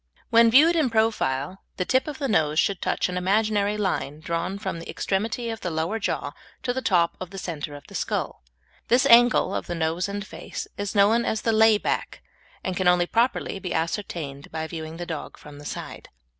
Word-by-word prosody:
When 230 0 +7
viewed 305 +8 +6
in 310 -6 +2
profile 195 - 0 0.2
the 180 - -1
tip 260 +7 +2
of 295 -3 -5
the 280 - -2
nose 155 - +1
should 195 -3 +1
touch - - 0
an 180 0 -4
imaginary 205 +2 +1
line 180 -7 -2
drawn 170 +4 -3
from 200 -5 -4
the 165 - -9
extremity 225 +4 -2
of 225 - -6
the 180 - -2
lower 165 +7 -1
jaw - - -2 0.3
to 245 - 0
the 260 - -2
top 175 -7 +2
of 185 - -6
the 195 - -9
centre 155 -5 -5
of 145 - -12
the - - -15
skull. - - -2 0.5
This 250 +3 +4
angle 240 -1 +6
of - - -3
the 175 - -3
nose 165 +3 -1
and 200 0 -4
face - - -7
is 205 0 -4
known 210 +4 +4
as 220 - -1
the 225 - +2
lay 220 0 +6
back, - - -3 0.4
and 185 - -2
can 185 0 0
only 180 0 +4
properly 230 -1 0
be 180 -2 -4
ascertained 160 -5 -3
by 160 0 -3
viewing 160 0 -7
the 175 - -5
dog 160 -3 -6
from 145 -1 -12
the 145 - -12
side. - - -7
195 Hz, 210 wpm, -25 LUFS, 165-225 Hz, 0.5 s, When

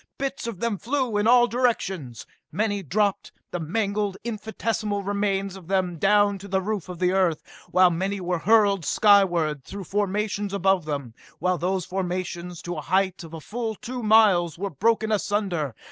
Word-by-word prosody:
Bits 275 -3 -3
of 220 -6 -5
them 230 -4 -1
flew 255 -2 -1
in 205 +1 +2
all 240 0 +6
directions. 195 - -1 0.3
Many 205 -1 -1
dropped, 200 +4 0 0.2
the 175 - -3
mangled, 200 +3 -1
infinitesmal 215 -2 -2
remains 200 -1 -1
of 185 -4 -12
them, 185 -3 0
down 205 +1 +3
to 200 - -10
the 190 0 +1
roof 200 -1 -3
of 180 0 -5
Earth, 180 -3 +2 0.3
while 185 0 +5
many 190 +4 -2
were 180 -1 -2
hurled 200 -2 +3
skyward 175 -8 +3
through 200 +7 -7
formations 205 +1 -1
above 190 -3 +2
them 140 -6 -4 0.2
while 180 -1 0
those 185 0 -1
formations, 180 -2 -4
to 175 -1 -4
a - - -3
height 185 +3 0
of 165 0 -9
a - - -6
full 225 +6 -4
two 250 +4 -6
miles, 210 -7 +4
were 200 +2 -3
broken 220 - +1
asunder. 195 - -1
195 Hz, 165 wpm, -25 LUFS, 180-210 Hz, 0.3 s, all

